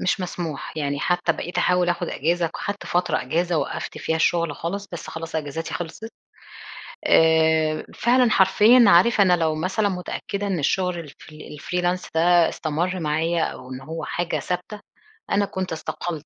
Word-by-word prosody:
مش 185 - 0
مسموح، 170 -5 -5
يعني 145 -2 -2
حتى 175 0 +1
بقيت 175 - -5
أحاول 180 0 +2
آخد 175 - -1
إجازة، 170 +2 0
خدت 205 0 -5
فترة 175 0 0
إجازة 170 +5 0
وقّفت - - -4
فيها 160 - -1
الشغل 165 -2 +1
خالص، 200 +4 -4
بس 170 - -6
خلاص 165 0 -5
أجازاتي 160 +2 -4
خلصت. 175 +7 -6 1.0
آآ 160 -1 +3
فعلًا 245 0 +3
حرفيًا، 210 +6 +6
عارف 200 +4 +5
أنا 180 -2 +5
لو 160 -2 0
مثلًا 190 +6 0
متأكدة 195 +2 -4
إن 185 -4 -1
الشغل 180 +4 0
ال-fr 150 0 -12
الfreelance 175 +4 -3
ده 170 0 +4
استمر 175 +4 -2
معايا، 160 +2 0
أو 130 0 -5
إن 130 +1 -7
هو 160 +4 -6
حاجة 175 0 -2
ثابتة 180 +4 -4 0.5
أنا 200 0 +2
كنت 185 -2 -4
استقلت. 160 -1 -5
175 Hz, 155 wpm, -23 LUFS, 160-185 Hz, 1.0 s, حرفيًا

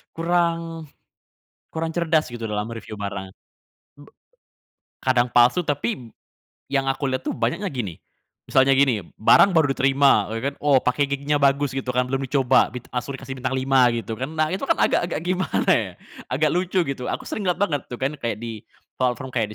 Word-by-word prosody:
Kurang 165 -1 -1 0.9
kurang 160 0 -2
cerdas, 160 -3 +1
gitu, 120 -1 -5
dalam 105 +1 -3
mereviu 115 -2 -8
barang. 100 -2 -6 0.6
B 145 0 -16 0.9
kadang 125 -1 +1
palsu, 125 +9 +4
tapi 130 -6 -3 0.6
yang 135 -1 0
aku 135 +1 -2
lihat 130 -1 -2
tuh - - -3
banyaknya 180 - -1
gini. 115 - -4 0.5
Misalnya 135 0 +4
gini, 135 -5 +3
eee, 85 - -14
b - - -23
barang 185 - +5
baru 160 -4 +4
diterima, 135 -5 +3
ya 130 +5 -1
kan, - - -17
"Oh, 140 -3 +3
packaging-nya 140 +2 0
bagus," 140 0 +2
gitu 135 0 -5
kan, 125 - +3
belum 135 0 -1
dicoba, 130 -1 +3
bit 125 - -6
langsung 125 +3 -4
dikasih 130 0 -7
bintang 130 +1 -2
5, 130 -1 +3
gitu 115 -1 -4
kan. 130 - -2
Nah, 155 0 +1
itu 190 +9 -3
kan, - - +3
agak-agak 175 -3 +1
gimana, 185 +2 0
ya. - - +2 0.3
Agak 150 +4 +1
lucu, 180 +2 +1
gitu. 140 -5 -4
Aku - - -3
sering 205 - -5
ngelihat 180 +1 0
banget, 150 -8 +1
tuh - - -7
kan, 135 - +1
kayak 115 -4 -2
di 115 -2 -7 0.3
platform 130 +1 -1
kayak 110 -4 -2
135 Hz, 180 wpm, -23 LUFS, 125-155 Hz, 0.9 s, barang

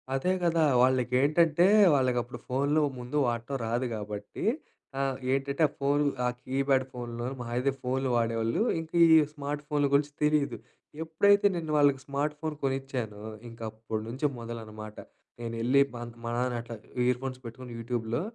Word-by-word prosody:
అదే 180 +8 +1
కదా! 165 -1 +3 0.2
వాళ్ళకేంటంటే, 140 +7 +3 0.3
వాళ్ళకప్పుడు 125 -2 0
ఫోన్‌లు 140 +4 +1 0.2
ముందు 125 +4 -4
వాడటం 120 +3 -2
రాదు 120 +3 0
గాబట్టి 105 -1 -6 0.5
ఆహ్, 135 -1 0
ఏంటంటే 135 +3 -1
ఆ - - -15
ఫోన్ 140 +1 +2 0.2
ఆ - - +3 0.2
కీప్యాడ్ 135 0 +1
ఫోన్‌‌లు 120 -1 -5
మహా 120 -1 -6
అయితే 135 +2 +2
ఫోన్‌లు 130 +1 -1
వాడేవాళ్ళు. 115 - 0 0.2
ఇంక 160 0 -8 0.2
ఈ - - +9 0.2
స్మార్ట్ 145 0 -4
ఫోన్‌లు 145 -2 +1
గురించి 145 +1 +3
తెలీదు. 150 -1 +2 0.5
ఎప్పుడైతే 200 +6 +4
నేను 160 -3 -3
వాళ్ళకి 140 -2 +4
స్మార్ట్ 145 +2 -2
ఫోన్ 155 -1 -3
కొనిచ్చానో, 130 -6 -3 0.3
ఇంకప్పటి 110 -1 -5
నుంచి 130 +6 -3
మొదలనమాట. 110 -2 -8 0.5
నేనెళ్ళి 115 +4 +2
మా - - -6 0.2
మా 115 - -3
నాన్న 125 0 0
అట్లాగ 115 -1 -9 0.3
ఇయర్ 125 0 +2
ఫోన్స్ 130 -1 -4
పెట్టుకొని 120 +1 -8
యూట్యూబ్‌లో 115 +1 -2
130 Hz, 145 wpm, -29 LUFS, 115-145 Hz, 0.5 s, ఈ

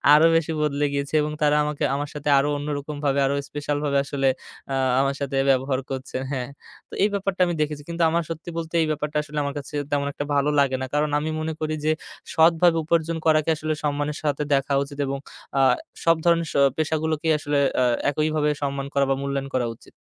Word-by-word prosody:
আরো 160 +2 +6
বেশি 165 0 +1
বদলে 145 -1 +1
গিয়েছে 140 +1 -3
এবং 150 0 -2
তারা 150 0 +4
আমাকে 150 -1 -3
আমার 145 +1 -3
সাথে 150 0 -3
আরো 145 +2 +1
অন্যরকমভাবে 145 -1 -2
আরও 140 +1 +1
স্পেশাল 145 0 -2
ভাবে 140 -1 +1
আসলে 135 -1 +1 0.4
আ - - +1 0.2
আমার 135 0 +1
সাথে 140 -1 -2
ব্যবহার 130 0 +2
করছে, 130 -1 -4
হ্যাঁ। 130 -1 -3 0.4
তো - - -15
এই 210 - +4
ব্যাপারটা 195 -2 -1
আমি 175 -1 -1
দেখেছি 150 -1 -2
কিন্তু 170 0 0
আমার 170 +1 +1
সত্যি 165 +1 -6
বলতে 165 0 -5
এই 160 - +1
ব্যাপারটা 150 0 -2
আসলে 150 +1 -8
আমার 140 0 -3
কাছে 140 +1 -8 0.2
তেমন 140 -1 +1
একটা 145 - -4
ভালো 140 +1 +2
লাগে 135 -2 +3
না। - - -1
কারণ, 150 0 +1
আমি 155 +2 -3
মনে 160 0 -2
করি 155 0 -1
যে, 155 - +4 0.4
সৎভাবে 165 +1 +5
উপার্জন 165 0 0
করাকে 155 0 +3
আসলে 155 +1 -2
সম্মানের 145 0 -1
সাথে 150 0 0
দেখা 140 0 +1
উচিত 140 0 -10
এবং 135 0 -2 0.4
অ্যা 135 - +4 0.4
সব 165 0 +5
ধরনের 170 -1 +3
শো - - +2 0.2
পেশাগুলোকেই 160 0 0
আসলে 145 -1 0 0.2
অ্যা 125 - +4 0.2
একইভাবে 155 0 +1
সম্মান 140 -1 -2
করা 140 0 +3
বা 135 - +3
মূল্যায়ন 140 0 -2
করা 120 -2 +1
উচিত। - - -19
150 Hz, 205 wpm, -24 LUFS, 140-155 Hz, 0.4 s, আরো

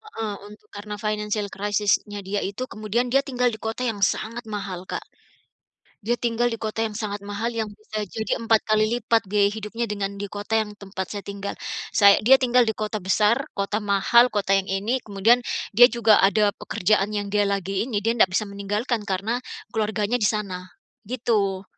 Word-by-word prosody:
Heeh, 220 -2 -3
untuk 210 0 -16
karena 210 +1 -6
financial 210 0 -2
crisis-nya 205 0 0
dia 205 +1 -1
itu, 200 +6 -4
kemudian 220 +4 -1
dia 270 - +5
tinggal 250 -3 0
di 220 - -8
kota 225 +3 -4
yang 225 -4 -2
sangat 225 +4 0
mahal 195 -4 -5
Kak. - - -4 1.0
Dia 240 +3 +1
tinggal 240 0 +1
di - - -2
kota 220 0 -3
yang 215 -2 -4
sangat 205 -2 -4
mahal, 205 +4 -3
yang 225 -2 -2
bisa 215 0 -6
jadi 220 +7 -2
empat 225 -1 +3
kali 215 0 +4
lipat 230 -1 +2
biaya 200 0 +3
hidupnya 220 +2 -4
dengan 200 -1 -3
di 205 - -4
kota 205 +2 -2
yang 210 -1 -4
tempat 190 -2 -6
saya 205 - -4
tinggal. 200 0 -5 0.4
Say 200 -2 +7
dia 265 +4 +8
tinggal 250 -1 +4
di - - +2
kota 215 0 -3
besar, 210 +4 +3 0.2
kota 200 +2 -1
mahal, 205 +5 +5
kota 205 -2 0
yang 195 - +1
ini, 205 +7 0
kemudian 215 +4 +3 0.4
dia 245 +1 +9
juga 225 -3 +5
ada 205 +1 +3
pekerjaan 215 -1 +1
yang 205 -1 -2
dia 205 0 +3
lagi 195 0 -1
ini, 225 -5 -2
dia 230 +1 +1
ndak 190 -5 +4
bisa 215 - +1
meninggalkan 205 +4 -2
karena 205 +5 -1 0.4
keluarganya 215 +1 0
di - - +1
sana, 185 -4 -4 0.4
gitu. 210 -6 0
210 Hz, 185 wpm, -24 LUFS, 200-225 Hz, 1.0 s, dia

